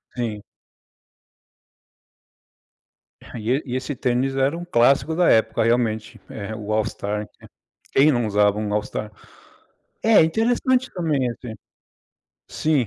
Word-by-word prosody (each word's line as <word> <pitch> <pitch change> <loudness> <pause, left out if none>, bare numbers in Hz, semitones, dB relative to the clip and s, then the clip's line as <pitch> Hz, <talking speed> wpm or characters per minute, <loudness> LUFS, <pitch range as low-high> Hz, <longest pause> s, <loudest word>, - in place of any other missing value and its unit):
Sim. 110 -4 -3 2.8
E - - -10
e 140 +4 +2
e 125 -1 -4
esse 130 +2 -3
tênis 130 +2 0
era 135 +5 +1
um 175 - -7
clássico 140 +2 +3
da 175 0 +3
época 110 0 +3
realmente, 115 -2 0
eh, 110 0 -6
o 105 -1 -6
All 110 -1 +1
Star. 105 +1 -4 0.7
Quem 145 +2 +5
não 120 -2 0
usava 105 0 +2
um 105 -1 -3
All 105 - +1
Star? 105 0 -6 0.9
É, 225 -6 +6
interessante 245 +8 +1
também, 150 -8 0
assim 115 -1 -8 0.9
Sim. 150 -7 0
125 Hz, 125 wpm, -22 LUFS, 110-155 Hz, 2.8 s, É